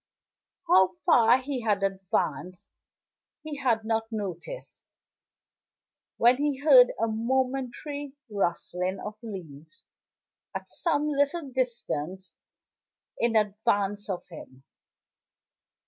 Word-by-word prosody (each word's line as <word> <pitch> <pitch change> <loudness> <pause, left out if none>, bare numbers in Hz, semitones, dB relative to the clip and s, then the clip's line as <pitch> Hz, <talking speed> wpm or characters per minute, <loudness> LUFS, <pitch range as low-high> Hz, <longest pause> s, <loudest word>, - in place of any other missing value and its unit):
How 190 - +5
far 235 +1 +6
he 260 -1 -4
had 205 -3 +1
advanced 185 -2 -2 0.7
he 305 -2 -5
had 235 -5 +1
not 225 0 -1
noticed, 205 - -6 1.3
when 240 +2 +5
he 290 -1 0
heard 265 -3 +7
a 225 - +2
momentary 265 +4 -2
rustling 185 -2 -2
of 210 - -6
leaves 165 -9 -10 0.7
at - - -5
some 300 -3 0
little 285 0 0
distance 190 - -3 0.8
in 235 -1 +1
advance 205 -1 +1
of 185 -2 -3
him. 135 -6 -12
225 Hz, 95 wpm, -27 LUFS, 190-265 Hz, 1.3 s, heard